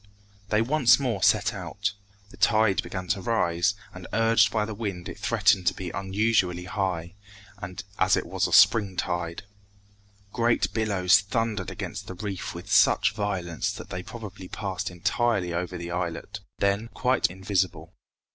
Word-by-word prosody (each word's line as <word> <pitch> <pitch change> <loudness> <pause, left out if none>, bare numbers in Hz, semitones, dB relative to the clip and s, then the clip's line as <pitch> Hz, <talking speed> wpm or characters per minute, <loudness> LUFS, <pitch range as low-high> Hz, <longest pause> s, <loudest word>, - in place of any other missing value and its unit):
They 110 +1 +3
once 125 -2 +4
more 120 -8 -1
set 105 +2 +3
out. 100 +2 -3 0.4
The - - -15
tide 110 -3 +3
began 95 -1 -6
to 100 -2 0
rise, 90 -3 +1 0.2
and 90 -1 -9
urged 115 -2 +4
by 105 -1 0
the 110 - -5
wind 100 -5 -5
it - - -8
threatened 90 -2 +2
to - - +3
be 90 -2 -5
unusually 95 -2 0
high, 90 -4 -3 0.9
as - - +4
it - - -2
was - - -1
a - - -7
spring 100 -5 +5
tide. 85 0 -2 0.9
Great 120 -1 +1
billows 100 -4 +3
thundered 105 -1 -2
against - - -6
the 95 - -7
reef 100 0 -5
with - - -8
such - - +4
violence 90 -5 -2
that - - -10
they 90 - -4
probably 100 -3 -9
passed 95 0 -4
entirely 90 +1 0
over 90 +1 -3
the 85 0 -6
islet, 85 -2 -4 0.2
then 100 +3 +1
quite 130 0 +2
invisible. 95 0 -2
100 Hz, 155 wpm, -26 LUFS, 90-110 Hz, 0.9 s, spring